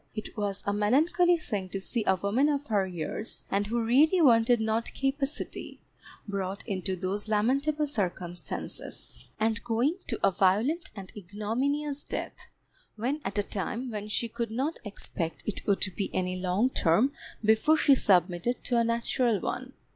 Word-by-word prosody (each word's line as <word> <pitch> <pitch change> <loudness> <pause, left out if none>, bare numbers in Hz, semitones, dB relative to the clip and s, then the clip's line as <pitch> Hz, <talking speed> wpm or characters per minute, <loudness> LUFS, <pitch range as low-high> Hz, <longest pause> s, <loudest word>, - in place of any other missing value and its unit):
It 215 - -6
was 200 -2 -2
a 200 - +1
melancholy 320 - +3
thing 205 - -4
to 195 - -3
see 225 +4 -2
a 190 - +5
woman 205 +10 +2
of 290 -1 -1
her 205 -6 +1
years, 180 +4 -4
and 200 +1 +1
who 235 +2 0
really 295 +10 +4
wanted 240 -5 +5
not 220 +1 -1
capacity, 275 +1 -2 0.5
brought 195 -1 -4
into 190 -1 -2
those 190 +4 -3
lamentable 275 +8 +1
circumstances, 180 -9 -4
and 220 +1 +1
going 240 +9 +1
to - - -2
a - - +3
violent 210 - +2
and 195 -3 -8
ignominious 250 +10 -2
death, - - -5 0.5
when 260 +8 -2
at 195 +1 0
a 205 - +3
time 230 +6 -3
when 210 -1 -4
she 220 +2 0
could 230 0 -3
not 265 +8 -2
expect 175 -6 -4
it 210 - -2
would 200 -1 +3
be 200 - -2
any 185 0 0
long 185 +7 +1
term 210 +11 +3 0.3
before 220 +9 +4
she 285 - +5
submitted 185 +1 +2
to 245 - +1
a - - +4
natural 230 -1 +1
one. 255 +7 -4
220 Hz, 160 wpm, -29 LUFS, 195-260 Hz, 0.5 s, a